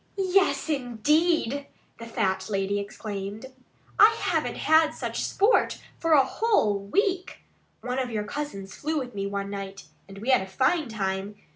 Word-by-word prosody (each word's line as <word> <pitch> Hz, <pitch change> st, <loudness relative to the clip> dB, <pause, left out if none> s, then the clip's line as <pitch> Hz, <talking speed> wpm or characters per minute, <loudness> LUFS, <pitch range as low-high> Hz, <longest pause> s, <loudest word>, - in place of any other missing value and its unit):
"Yes, 385 Hz, -1 st, +2 dB
indeed!" 285 Hz, +1 st, +1 dB, 0.3 s
the 230 Hz, -, -8 dB
fat 195 Hz, -5 st, -1 dB
lady 200 Hz, 0 st, 0 dB
exclaimed. 200 Hz, +1 st, -6 dB, 0.5 s
"I 440 Hz, +1 st, +7 dB
haven't -, -, 0 dB
had 315 Hz, 0 st, +3 dB
such -, -, -3 dB
sport 410 Hz, +5 st, +2 dB, 0.2 s
for 330 Hz, -1 st, +2 dB
a 275 Hz, -3 st, +6 dB
whole 265 Hz, -, +1 dB
week. 370 Hz, -, -1 dB, 0.4 s
One 250 Hz, +1 st, -2 dB
of 255 Hz, -2 st, -2 dB
your 215 Hz, -2 st, -2 dB
cousins 210 Hz, -6 st, -6 dB
flew 310 Hz, +2 st, -2 dB
with 250 Hz, -4 st, -4 dB
me 200 Hz, -1 st, -3 dB
one 200 Hz, 0 st, -4 dB
night. 195 Hz, -1 st, -6 dB, 0.2 s
And 195 Hz, 0 st, -11 dB
we 225 Hz, +6 st, 0 dB
had 255 Hz, -, +5 dB
a 190 Hz, -, -6 dB
fine 265 Hz, -, +1 dB
time. 195 Hz, -1 st, -3 dB
235 Hz, 155 wpm, -26 LUFS, 200-315 Hz, 0.5 s, I